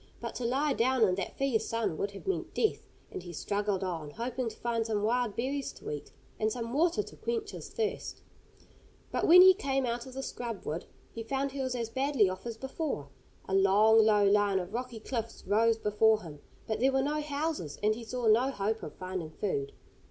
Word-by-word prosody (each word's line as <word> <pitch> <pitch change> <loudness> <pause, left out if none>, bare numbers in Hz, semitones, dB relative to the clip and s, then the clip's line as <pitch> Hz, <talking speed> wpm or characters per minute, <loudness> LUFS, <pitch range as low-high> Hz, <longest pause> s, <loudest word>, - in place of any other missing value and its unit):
But - - -5
to 250 - -3
lie 275 +4 +1
down 255 0 +2
in 185 - +1
that 185 0 -4
fierce 270 -5 +1
sun 230 -7 -1
would 200 - 0
have 200 0 -11
meant 385 - -2
death, 435 - 0 0.2
and - - -5
he 175 0 -9
struggled 200 +2 -1
on, 165 -5 -3
hoping 235 - -3
to - - -11
find 235 -1 -1
some 215 -2 -1
wild 240 -1 +1
berries 270 +3 -2
to - - -7
eat, 145 -1 -6 0.3
and 215 0 +1
some 235 -1 -4
water 340 +7 +2
to - - -12
quench 450 -3 -3
his - - -8
thirst. 445 -2 -3 0.9
But - - 0
when 360 +2 +10
he 375 0 +9
came 270 -8 -1
out 240 +1 -3
of 260 - -10
the 270 - -4
scrub 235 -6 -5
wood, 160 +3 -3 0.3
he 230 - -5
found 270 +4 -2
he 275 0 -4
was 260 -1 -1
as 230 -2 -3
badly 265 -4 +2
off 185 +5 -5
as 230 -1 -5
before. 265 - -4 0.4
A 190 - -3
long, 210 +3 +6
low 210 -1 +4
line 200 -1 +3
of 185 +2 -4
rocky 245 -1 -4
cliffs 230 0 -4
rose 225 +2 +3
before 215 0 +3
him, 150 -4 -9 0.3
but 220 - -2
there 265 +2 +4
were 265 0 +2
no 300 +2 0
houses, 290 - -3
and 215 +1 +4
he 230 +2 -7
saw 245 +1 -4
no 230 +5 +5
hope 220 -2 -2
of - - -8
finding 185 -3 -5
food. 155 -5 -2
230 Hz, 215 wpm, -30 LUFS, 205-265 Hz, 0.9 s, when